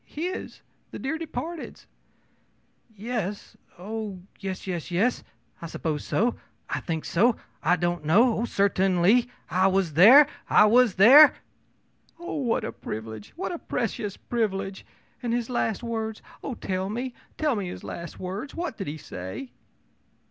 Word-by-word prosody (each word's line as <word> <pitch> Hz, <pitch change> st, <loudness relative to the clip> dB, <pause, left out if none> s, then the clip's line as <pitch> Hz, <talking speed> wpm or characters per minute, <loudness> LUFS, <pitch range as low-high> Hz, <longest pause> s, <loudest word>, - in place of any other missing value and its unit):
ō'His. 355 Hz, +5 st, -4 dB, 0.3 s
The -, -, -8 dB
dear 315 Hz, +4 st, -3 dB
departed's.' 330 Hz, +1 st, -6 dB, 1.1 s
ō'Yes! 210 Hz, -2 st, -4 dB, 0.2 s
Oh, 205 Hz, -1 st, -6 dB, 0.2 s
yes 190 Hz, -2 st, -5 dB
yes 175 Hz, -4 st, -4 dB
yes! 200 Hz, +8 st, +1 dB, 0.4 s
I 170 Hz, -, -5 dB
suppose 155 Hz, -2 st, -3 dB
so, 235 Hz, +3 st, 0 dB, 0.3 s
I -, -, -2 dB
think 160 Hz, -2 st, -4 dB
so, 225 Hz, +7 st, +3 dB, 0.3 s
I 180 Hz, -, +3 dB
don't 175 Hz, -2 st, -1 dB
know! 215 Hz, +10 st, +4 dB
Oh, 235 Hz, -, 0 dB
certainly 195 Hz, +2 st, +3 dB, 0.2 s
I 185 Hz, +2 st, +4 dB
was 190 Hz, -4 st, +1 dB
there 235 Hz, -, +9 dB, 0.2 s
I -, -, +7 dB
was 235 Hz, -1 st, +4 dB
there!' 270 Hz, +10 st, +9 dB, 0.8 s
ō'Oh, 340 Hz, -3 st, -4 dB
what 230 Hz, -, 0 dB
a -, -, -3 dB
privilege! 110 Hz, -1 st, -7 dB
what 365 Hz, +2 st, -3 dB
a 345 Hz, -, -5 dB
precious 210 Hz, -4 st, -3 dB
privilege! 195 Hz, -4 st, -3 dB, 0.3 s
And 240 Hz, -2 st, -1 dB
his 240 Hz, 0 st, -2 dB
last 225 Hz, -2 st, -1 dB
words 220 Hz, -2 st, -4 dB, 0.2 s
oh, 265 Hz, -, -4 dB
tell 190 Hz, -2 st, -3 dB
me, 245 Hz, +4 st, -4 dB, 0.2 s
tell 300 Hz, -5 st, +1 dB
me 200 Hz, -3 st, -3 dB
his 180 Hz, -, -7 dB
last 170 Hz, -2 st, -7 dB
words! 195 Hz, +9 st, -5 dB
What 335 Hz, -8 st, -4 dB
did 195 Hz, -, -5 dB
he 150 Hz, +2 st, -4 dB
say?' 95 Hz, -, -7 dB
210 Hz, 150 wpm, -26 LUFS, 180-245 Hz, 1.1 s, there